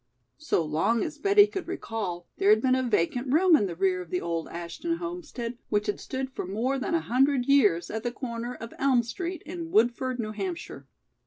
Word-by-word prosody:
So 295 - 0
long 160 +10 +1
as 305 -2 -5
Betty 400 +4 +6
could 390 -4 -6
recall, 205 - -4
there 395 +1 +3
had 430 - +7
been 260 -1 +2
a 260 - +2
vacant 245 +1 0
room 340 +3 +6
in 205 -9 +2
the 170 - -5
rear 185 0 +1
of 175 - -10
the 180 - 0
old 165 -1 -3
Ashton 170 - -4
homestead, 315 -9 -6
which 210 -1 +1
had 205 - -2
stood 265 0 -4
for 225 - -5
more 240 +8 -1
than 335 - -1
a 330 - +1
hundred 265 0 +2
years 210 -12 +3
at 220 - -3
the 240 +1 -2
comer 240 -1 -5
of 230 0 -9
Elm 260 -3 +3
Street 345 +8 -5
in 335 +1 -6
Woodford, 245 +1 +2
New 215 -2 -2
Hampshire. 180 -9 -5
245 Hz, 210 wpm, -27 LUFS, 200-300 Hz, -, had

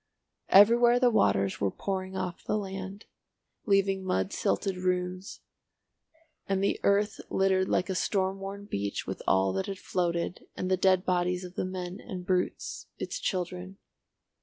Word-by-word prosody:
Everywhere 235 +4 +7
the 250 -1 +4
waters 100 - +2
were 100 - +2
pouring 190 - -4
off 180 -2 -4
the - - 0
land, 195 0 -6 0.6
leaving 195 -1 +2
mud 95 - -1
silted 180 - 0
ruins, 180 +1 -2 1.1
and 195 0 +1
the 200 - +1
earth 205 +1 +2
littered 190 -1 +2
like - - +1
a 190 - -1
storm 190 0 0
worn 200 +1 -6
beach 100 - -3
with - - -5
all 95 0 +3
that 190 - -2
had 195 -1 -4
floated, 175 -1 -2
and 185 - -2
the - - +5
dead 185 0 +3
bodies 180 0 +1
of 180 -1 -8
the - - -2
men 185 0 -5
and 180 -2 -7
brutes, 180 -1 -2
its - - -4
children. 185 - -3
185 Hz, 155 wpm, -29 LUFS, 180-195 Hz, 1.1 s, Everywhere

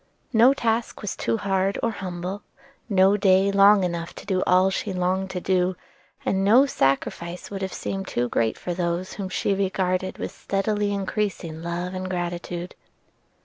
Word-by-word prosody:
No 240 +5 +6
task 230 -3 -1
was 210 - -3
too 115 -1 -1
hard 195 0 0
or 230 - +2
humble; 185 0 -5 0.5
no 195 0 +4
day 195 -1 +4
long 200 0 +6
enough 170 -1 -3
to - - -10
do 190 -2 0
all 185 +1 +4
she 195 +1 -2
longed 185 +1 0
to 185 - -3
do; 185 0 +1 0.5
and 190 0 +1
no 235 +8 +6
sacrifice 170 - -1
would 195 -1 -5
have 190 -1 -2
seemed 195 0 -4
too 120 0 -1
great 115 -1 0
for 180 - -4
those 175 +1 -2
whom 195 -2 -5
she 195 - 0
regarded 185 -1 -1
with - - -4
steadily 205 +1 -1
increasing 195 -5 -2
love 175 +2 -3
and 185 0 -4
gratitude. 175 0 -4
190 Hz, 165 wpm, -24 LUFS, 180-200 Hz, 0.5 s, No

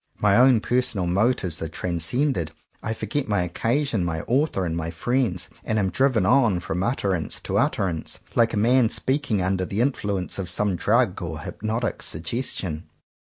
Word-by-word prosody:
My 105 -1 +3
own 125 -1 +6
personal 120 -7 0
motives 95 -2 0
are 80 - -2
transcended, 85 - 0 0.3
I 110 - -3
forget 115 +7 -3
my 105 -4 +1
occasion, 115 - 0
my 80 -2 -2
author, 125 - 0
and 80 -1 -2
my 80 0 -3
friends, 95 +1 0 0.2
and 110 - -1
am 95 -3 +1
driven 130 -7 +2
on 115 -5 +4
from 85 0 -3
utterance 95 - -1
to - - 0
utter - - +1
ance, 80 -3 -3
like 115 -1 +2
a - - -1
man 120 +2 +4
speaking 130 -7 0
under 95 0 0
the 100 +3 -3
in 130 +4 +3
fluence 100 -6 -3
of 90 -3 -3
some 105 -3 0
drug 105 +1 +1
or 80 -3 -5
hypnotic 110 +7 -3
suggestion. 85 -2 -3
100 Hz, 170 wpm, -24 LUFS, 90-120 Hz, 0.3 s, own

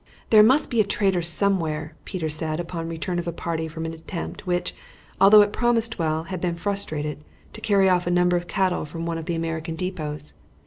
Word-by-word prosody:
"There 215 -1 +9
must 265 +7 +4
be 235 -2 +4
a - - +3
traitor 195 -2 +1
somewhere," 165 -3 0
Peter 175 -4 -3
said 155 +1 -1
upon 170 -1 -4
the - - -5
return 175 +2 -3
of 175 - -5
a - - 0
party 165 -1 -3
from 160 +1 -6
an 160 - -4
attempt 170 +4 -7
which, 175 0 -1 0.5
although 205 +2 +9
it 205 - -3
promised 230 -2 +1
well, 160 -1 0
had 185 0 -6
been 175 -2 -1
frustrated, 155 -6 -3 0.3
to - - -9
carry 200 -3 +3
off 180 -1 +2
a - - +2
number 180 0 +3
of 175 0 -2
cattle 190 -2 0
from 165 +2 -6
one 165 -1 -2
of 160 - -7
the 170 -1 -2
American 165 0 -3
depots. 155 -5 -4
175 Hz, 215 wpm, -24 LUFS, 160-195 Hz, 0.5 s, There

